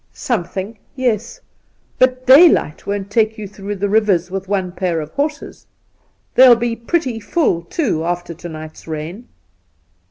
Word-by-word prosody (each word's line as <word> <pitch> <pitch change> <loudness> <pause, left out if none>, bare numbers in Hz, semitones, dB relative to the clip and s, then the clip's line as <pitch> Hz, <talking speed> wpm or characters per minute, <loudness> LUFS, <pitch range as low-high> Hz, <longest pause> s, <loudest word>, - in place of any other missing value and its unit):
' - - -42 0.2
Something 200 0 -3
— - - -40
yes; 235 -1 -1 0.6
but 255 0 +2
daylight 270 - +5
won't 200 0 -3
take 220 0 +1
you 210 -2 -6
through 200 +1 -6
the 205 +1 -1
rivers 200 -4 +1
with 195 0 -4
one 190 -2 -1
pair 175 -2 -2
of 155 0 -7
horses. 295 +1 -4 0.7
They'll 255 -2 +8
be 235 0 -2
pretty 245 0 -2
full, 210 - 0
too, 170 - -2
after 175 0 -3
to 175 +1 -9
night's 155 0 -10
rain.' 165 +9 -6
205 Hz, 155 wpm, -18 LUFS, 175-240 Hz, 0.7 s, They'll